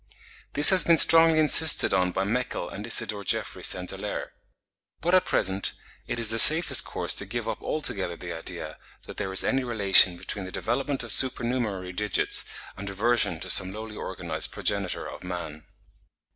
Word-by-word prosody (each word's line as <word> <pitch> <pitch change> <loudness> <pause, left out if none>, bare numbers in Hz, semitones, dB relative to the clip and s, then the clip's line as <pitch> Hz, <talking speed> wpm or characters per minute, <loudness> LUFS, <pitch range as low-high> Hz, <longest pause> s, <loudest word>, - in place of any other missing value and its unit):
This 145 +4 +7
has 185 -2 +4
been 170 -1 +2
strongly 165 0 +5
insisted 155 0 +4
on 90 -1 -1
by 95 +1 -3
Meckel 115 -3 -4
and 105 +3 -10
Isidore 105 -3 -1
Geoffroy - - -4
St. - - -1
Hilaire. - - -8 0.7
But 175 +4 -3
at 185 - +2
present 95 +1 -2 0.3
it 120 - -4
is 115 -2 0
the 115 +1 +1
safest 160 +7 +8
course - - -2
to - - -1
give 115 +2 -7
up - - -6
altogether 95 - -5
the 85 -1 -9
idea 80 - -8 0.3
that - - -13
there 100 -2 -5
is 95 - +2
any 135 0 -2
relation 100 -6 +2
between 95 +2 -6
the 95 - -10
development 135 +6 -4
of 120 - -4
supernumerary 115 -6 +2
digits 105 +2 -1 0.3
and 100 +1 -8
reversion 100 -3 -1
to 95 - -4
some 95 -1 -1
lowly 110 +1 -10
organised - - -6
progenitor 100 -3 -4
of - - -12
man.) 85 -4 -9
105 Hz, 170 wpm, -24 LUFS, 95-130 Hz, 0.7 s, safest